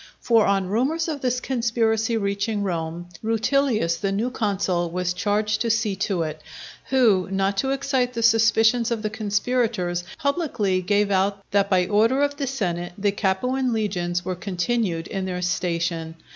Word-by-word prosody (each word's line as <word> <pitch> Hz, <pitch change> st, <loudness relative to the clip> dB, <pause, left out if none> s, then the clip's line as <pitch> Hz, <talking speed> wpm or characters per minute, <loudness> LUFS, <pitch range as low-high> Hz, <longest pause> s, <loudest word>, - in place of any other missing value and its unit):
For 230 Hz, -3 st, +3 dB
on 195 Hz, -1 st, +1 dB
rumours 280 Hz, -, 0 dB
of 300 Hz, -4 st, -4 dB
this 250 Hz, -1 st, 0 dB
conspiracy 230 Hz, -2 st, 0 dB
reaching 200 Hz, +1 st, -1 dB
Rome, 170 Hz, -2 st, -3 dB
Rutilius 225 Hz, -5 st, +1 dB
the 195 Hz, -1 st, -1 dB
new 220 Hz, +6 st, -1 dB
consul 190 Hz, -6 st, -1 dB
was 180 Hz, +1 st, -1 dB
charged 210 Hz, +3 st, 0 dB
to 230 Hz, -, 0 dB
see 215 Hz, -2 st, +1 dB
to 190 Hz, -3 st, 0 dB
it; 155 Hz, -1 st, -5 dB, 0.5 s
who, 225 Hz, -9 st, +3 dB
not 195 Hz, +1 st, 0 dB
to 265 Hz, -, 0 dB
excite 270 Hz, -2 st, 0 dB
the 230 Hz, -1 st, -2 dB
suspicions 225 Hz, +1 st, +4 dB
of 230 Hz, -2 st, -2 dB
the 215 Hz, -, -2 dB
conspirators, 210 Hz, -4 st, -1 dB
publicly 280 Hz, -, 0 dB
gave 205 Hz, +2 st, +1 dB
out 195 Hz, +1 st, +1 dB
that 200 Hz, 0 st, +2 dB
by 185 Hz, -2 st, +3 dB
order 225 Hz, +8 st, +3 dB
of 285 Hz, 0 st, -1 dB
the 275 Hz, -, -2 dB
senate 175 Hz, -9 st, -2 dB
the 205 Hz, 0 st, +1 dB
Capuan 245 Hz, +6 st, 0 dB
legions 180 Hz, -5 st, -1 dB
were 185 Hz, -, -1 dB
continued 180 Hz, -1 st, -1 dB
in 195 Hz, 0 st, -4 dB
their 180 Hz, -1 st, -3 dB
station. 170 Hz, -2 st, -1 dB
205 Hz, 160 wpm, -23 LUFS, 185-235 Hz, 0.5 s, suspicions